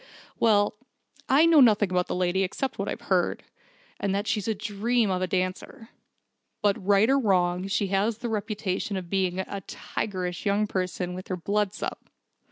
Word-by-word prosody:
"Well, 210 -2 +3 0.5
I 285 +5 +6
know 325 -3 +6
nothing 210 -5 +4
about 180 -1 +1
the - - -2
lady 180 +1 +1
except 250 +8 -2
what - - -2
I've - - -5
heard - - 0 0.6
and 195 -1 0
that 200 +1 -1
she's 220 -2 -1
a 220 - 0
dream 215 +1 0
of 185 0 -1
a 185 - 0
dancer. 185 +5 -3 0.7
But 200 -2 +1
right 200 +2 +4
or 275 +2 +4
wrong, 185 -4 +1
she 195 0 0
has 205 +3 +1
the 240 0 -4
reputation 205 -2 -2
of 180 -2 -7
being 185 -2 0
a 195 +1 -4
tigerish 180 -4 -4
young 205 +1 +2
person 185 -2 -3
when 185 - -5
her 185 - -2
blood's 205 +2 -1
up. - - -5
200 Hz, 175 wpm, -26 LUFS, 185-215 Hz, 0.7 s, I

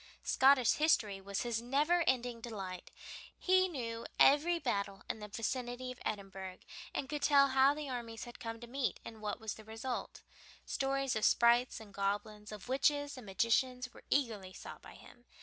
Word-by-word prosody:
Scottish 265 -2 +5
history 215 -11 +2
was 200 0 -3
his 235 -2 -1
never 295 +8 +2
ending 245 -2 0
delight; 195 -6 -6 0.5
he 370 0 +4
knew 235 -8 -5
every 305 +5 +6
battle 200 -10 -1
field 195 - -20
in - - -9
the 210 - -7
vicinity 245 +3 -3
of 255 - -11
Edinburgh, 195 -3 -5 0.3
and 270 - -3
could 295 +1 -4
tell 280 -1 +5
how 270 +2 +5
the 300 -1 -5
armies 235 -3 -5
had 240 -1 -10
come 230 -1 -5
to - - -7
meet 260 +2 -2
and 220 -1 -9
what 210 +1 -3
was 220 -2 -4
the 220 - -12
result. 225 +4 -5 0.4
Stories 275 -1 0
of 215 - -1
sprites 240 +1 +4
and 210 -3 -13
goblins, 205 +2 -2
of 210 0 -9
witches 285 +2 +1
and 250 -5 -10
magicians, 250 +5 +1
were - - -14
eagerly 220 -9 0
sought - - -9
by - - -12
him. 240 - -16
240 Hz, 180 wpm, -34 LUFS, 215-270 Hz, 0.5 s, every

